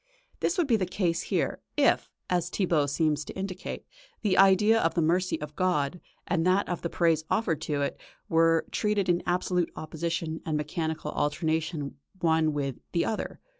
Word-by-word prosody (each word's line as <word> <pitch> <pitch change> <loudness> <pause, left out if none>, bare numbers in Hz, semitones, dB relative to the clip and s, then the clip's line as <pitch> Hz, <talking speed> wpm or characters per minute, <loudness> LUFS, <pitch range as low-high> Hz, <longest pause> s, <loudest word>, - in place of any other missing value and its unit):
This 355 - 0
would 350 - +3
be 240 -5 +3
the 185 -3 -1
case 175 -3 0
here, - - -1 0.2
if, - - +3 0.2
as 175 -1 0
Thibaut 170 -7 +1
seems 150 0 +1
to - - -8
indicate, 190 -1 -5 0.4
the 200 -4 +2
idea 195 +4 +6
of 165 - +1
the 170 - +2
mercy 180 +3 +1
of 150 0 -7
God, 180 -3 0 0.3
and 170 -2 +1
that 185 +3 +3
of 175 - -3
the 170 - -2
praise 165 -3 +2
offered 165 -9 0
to 145 -2 -1
it, - - -3 0.3
were 165 0 +3
treated 210 -3 0
in 175 0 +3
absolute 180 -1 +1
opposition 160 0 -3
and 155 -2 -1
mechanical 155 0 -3
alternation 155 -2 -1 0.2
one 160 -2 +3
with 140 -3 -2 0.2
the 170 - +2
other. 220 - -3
165 Hz, 170 wpm, -28 LUFS, 155-185 Hz, 0.4 s, idea